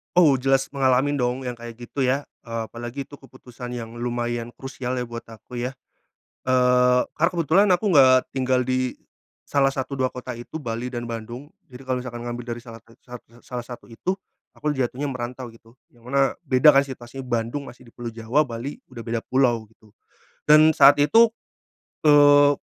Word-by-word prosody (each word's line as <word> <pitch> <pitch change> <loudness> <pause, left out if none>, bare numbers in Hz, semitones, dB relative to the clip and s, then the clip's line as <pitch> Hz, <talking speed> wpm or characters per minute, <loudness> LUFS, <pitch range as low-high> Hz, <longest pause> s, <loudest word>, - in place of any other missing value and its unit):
Oh 155 -7 +5
jelas 135 0 +1
mengalamin 135 +1 +2
dong 125 0 0
yang 125 -1 -5
kayak 120 0 -9
gitu 125 +3 -3
ya, 135 +3 +1 0.2
eee, 115 0 -3
apalagi 120 +4 -6
itu 145 +1 -13
keputusan 125 -1 -10
yang 115 -1 -7
lumayan 120 -1 -3
krusial 130 -1 -5
ya 125 - -2
buat 120 -1 -8
aku 115 +2 -9
ya. 125 +2 -3 0.7
Eee, 125 0 +4 0.2
karena 170 +3 +3
kebetulan 175 +4 +3
aku 175 - -3
nggak 130 -4 +7
tinggal 130 -1 +1
di 130 0 -1 0.5
salah 140 -1 +2
satu, 135 +1 -4
2 130 0 +2
kota 125 0 -7
itu 120 +6 -9
Bali 115 +1 -4
dan 120 -2 -5
Bandung. 120 +5 -7 0.2
Jadi 125 +1 -12
kalau 130 -1 -1
misalkan 120 -2 -7
ngambil 120 0 -5
dari 120 - -10
salah 115 -2 -11
sat 115 +1 -22
sat 125 -1 -9
sa 115 - -24
salah 120 -1 -6
satu 120 - -10
itu 180 +11 -2 0.4
aku 150 - -2
jatuhnya 130 +2 -2
merantau 125 0 -6
gitu, 115 0 -20 0.2
yang 120 0 -21
mana 135 0 +2
beda 130 +3 +6
kan 135 - +6
situasinya 130 0 -8
Bandung 120 +4 -2
masih 125 +1 -14
di 115 - -17
Pulau 120 -1 -6
Jawa, 115 +6 +1
Bali 120 +3 -6
udah 120 -2 -8
beda 115 0 -1
pulau 120 -4 +1
gitu 110 -2 -25 0.5
dan 155 +1 +7
saat 145 -2 +7
itu, 225 +11 +5 0.7
eee, 145 -1 +7
125 Hz, 185 wpm, -23 LUFS, 120-135 Hz, 0.7 s, nggak